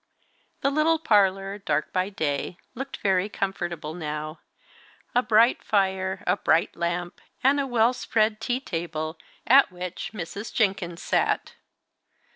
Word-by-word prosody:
The 275 - +2
little 310 +3 +3
parlour, 195 -7 +2
dark 150 -6 -1
by 185 +1 +1
day, 160 -3 -2 0.2
looked 270 +2 -6
very 190 0 +2
comfortable 175 -6 -3
now. 155 -1 -5 0.7
A 245 - +4
bright 230 0 +4
fire, 190 -2 0
a 180 +3 +2
bright 165 -3 +2
lamp, 175 +1 -3 0.2
and 275 +2 +4
a 275 - 0
well 240 -1 +3
spread 215 -3 0
tea 245 +3 -1
table, 165 - -4 0.3
at 270 -1 +6
which 180 0 -5
Mrs. 200 +2 -6
Jenkins 190 -5 0
sat. - - 0
195 Hz, 130 wpm, -26 LUFS, 175-225 Hz, 0.7 s, at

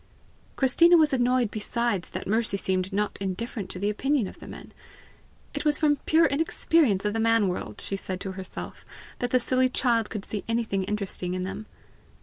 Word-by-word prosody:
Christina 335 +7 +5
was 310 -3 +4
annoyed 245 -3 +2
besides 220 -3 -1
that - - -6
Mercy 220 -1 0
seemed 185 0 -1
not 210 +1 -1
indifferent 195 +2 -4
to - - -5
the 200 +3 0
opinion 270 +2 0
of - - -9
the - - -11
men. - - -10 0.8
It - - -3
was 300 -1 +3
from 295 -2 +3
pure 325 +1 +5
inexperience 285 - +2
of 210 - 0
the 225 - -1
man 225 -2 +3
world, 145 - -4
she 195 - -3
said 185 -1 -5
to 195 - -4
herself, 190 0 -8 0.4
that 245 - -1
the 255 - +3
silly 255 +1 +2
child 235 -3 +1
could 210 -3 -5
see 210 - -4
anything 220 -5 0
interesting 190 -3 -2
in 185 - -2
them! 195 +3 -6
220 Hz, 185 wpm, -26 LUFS, 195-255 Hz, 0.8 s, Christina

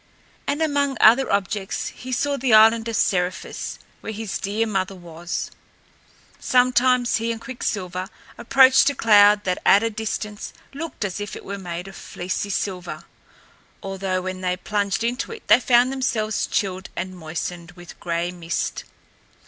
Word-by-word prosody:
And 295 +3 0
among 285 -3 0
other 240 +5 +5
objects 200 0 -1
he 255 - -9
saw 285 +3 0
the 255 -4 +3
island 225 +1 +6
of 230 - -2
Seriphus, 180 -2 -1 0.2
where - - -6
his 220 -1 -4
dear 210 +3 -1
mother 195 -3 -2
was. 175 -1 -6 0.9
Sometimes 250 -1 +3
he 230 +1 -1
and 230 - -4
Quicksilver 190 -7 -4 0.3
approached 265 +2 +5
a 285 - -4
cloud 205 -1 +5
that 185 -2 -1
at 200 +3 +5
a 230 - 0
distance 210 -1 -5 0.2
looked 295 -6 -5
as 195 0 -4
if 205 0 -5
it - - -10
were 200 0 -5
made 175 0 -6
of 195 - -11
fleecy 180 +3 -4
silver, 180 -5 -3 0.8
although 190 -1 -2
when 185 0 -5
they 180 0 -1
plunged 200 +2 -1
into 245 - -2
it 450 -2 -10
they - - +7
found 245 0 +4
themselves 225 -5 -1
chilled 190 0 -2
and 185 +1 -4
moistened 170 +1 -6
with 175 -1 -13
gray 170 0 -2
mist. 170 -1 -3
205 Hz, 155 wpm, -23 LUFS, 185-240 Hz, 0.9 s, they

